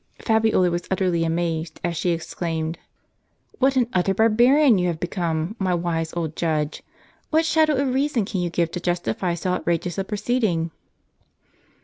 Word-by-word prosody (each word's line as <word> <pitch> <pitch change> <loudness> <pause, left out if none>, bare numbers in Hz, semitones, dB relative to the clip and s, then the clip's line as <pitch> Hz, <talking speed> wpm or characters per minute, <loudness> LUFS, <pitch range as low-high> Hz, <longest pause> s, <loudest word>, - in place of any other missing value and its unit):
Fabiola 220 -5 +2
was 175 0 -3
utterly 180 -3 +1
amazed, 165 -1 -2
as 175 -1 -1
she 175 - -1
exclaimed: 165 -1 -3 0.4
" - - -34
What 270 +1 +3
an 250 -2 +3
utter 190 +1 +1
barbarian 240 +3 +5
you 180 - +1
have 170 -2 -2
become, 170 +1 -2
my 185 -2 +1
wise 165 -2 -2
old 160 -2 -3
judge! 155 -3 -1 0.5
What 320 +1 +2
shadow 315 -1 +3
of 270 0 +1
I'eason 265 -4 +1
can 190 -2 -3
you 175 - -1
give 170 -1 0
to 180 - -4
justify 175 - -1
so 180 +2 -2
outrageous 175 0 -1
a - - 0
pro 210 +2 -4
ceeding?" 195 -9 0
180 Hz, 165 wpm, -23 LUFS, 165-220 Hz, 0.5 s, barbarian